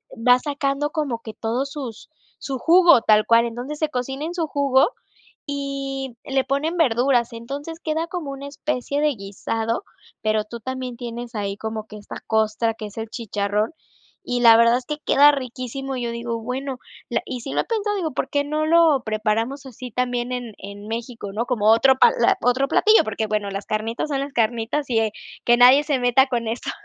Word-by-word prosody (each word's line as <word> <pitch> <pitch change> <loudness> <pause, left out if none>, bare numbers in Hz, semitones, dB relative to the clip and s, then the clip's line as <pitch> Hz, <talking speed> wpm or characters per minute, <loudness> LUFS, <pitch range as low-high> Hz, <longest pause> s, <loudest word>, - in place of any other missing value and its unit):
va 245 +2 +4
sacando 280 +1 -1
como 295 -8 -2
que 220 -1 -8
todos 240 +5 -2
sus 255 -5 -7 0.3
su 270 -2 -4
jugo, 340 -5 +6
tal 215 0 +4
cual, 230 0 +5
entonces 245 +6 -5
se 310 -1 0
cocina 270 +2 -4
en 335 - -4
su 335 -3 -1
jugo, 275 -2 +3 0.6
y 275 -3 -4
le 270 -1 +1
ponen 280 +6 -1
verduras, 245 -4 +2
entonces 280 +8 -7
queda 320 +1 -1
como 335 -6 -5
una 275 +1 -7
especie 285 -1 -2
de 300 0 +3
guisado, 225 - -3 0.4
pero 215 0 +1
tú 235 +2 -8
también 260 0 -5
tienes 240 0 -7
ahí 200 -1 -2
como 220 0 -5
que 215 - -11
esta 205 - -9
costra 220 +1 +1
que 215 -1 -7
es 205 - -12
el 225 - -4
chicharrón, 210 +1 -2 0.5
y 245 0 -1
la 230 -1 +8
verdad 235 +1 +5
es 250 - -11
que 300 0 -4
queda 290 +1 +7
riquísimo. 270 0 -5
Yo 240 -2 -2
digo: 235 0 -4
"bueno", 260 +2 -4 0.3
la - - -1
y 250 -2 -5
si 270 - -6
lo - - +2
he - - -2
pensado, 420 -2 -1
digo, 330 -7 -2
¿por - - -2
qué 285 - +1
no 305 +2 -1
lo 320 -4 +4
preparamos 220 +5 -1
así 250 -1 -9
también 245 +1 -1
en 245 -4 -5
en 200 +1 -9
México, 230 -2 -5
no? 225 +4 -2
Como 235 -5 0
otro 265 +4 +5
pla 235 -2 +4
otro 255 +3 +2
platillo, 430 +9 +5
porque, 215 +1 -2
bueno, 210 -1 -1
las 195 +1 -5
carnitas 225 +6 -2
son 275 -1 0
las 280 0 -4
carnitas 235 +5 0
y, 225 - +2
eh, 220 -1 0 0.3
que 240 - +5
nadie 255 +4 +7
se 285 -3 0
meta 245 +2 +4
con 235 -3 -2
eso. 235 +2 -3
250 Hz, 195 wpm, -22 LUFS, 225-280 Hz, 0.6 s, la